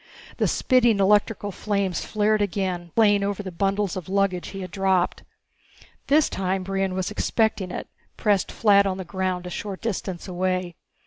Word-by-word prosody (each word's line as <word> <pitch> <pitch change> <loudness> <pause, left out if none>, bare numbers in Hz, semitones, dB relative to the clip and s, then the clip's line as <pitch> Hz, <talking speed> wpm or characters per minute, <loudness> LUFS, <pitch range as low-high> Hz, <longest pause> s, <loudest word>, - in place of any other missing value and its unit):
The - - +2
spitting 240 -4 +3
electrical 205 +1 +2
flames 200 -2 -1
flared 215 0 +1
again, 185 -3 -2
playing 205 -3 +4
over 200 0 -2
the 190 - -6
bundles 195 +2 0
of 185 -1 -6
luggage 195 -2 0
he 195 - -7
had 185 -2 -7
dropped. 190 -2 +1 0.9
This 300 +2 +4
time 190 0 -2
Brion 195 0 -1
was 185 +1 -2
expecting 215 -3 0
it, - - -5 0.3
pressed 205 -4 +1
flat 200 -2 +4
on 190 -1 -2
the 190 - -6
ground 185 0 -2
a 180 - -6
short 195 +1 -5
distance 195 -5 -4
away. 185 -1 -1
195 Hz, 165 wpm, -24 LUFS, 185-205 Hz, 0.9 s, playing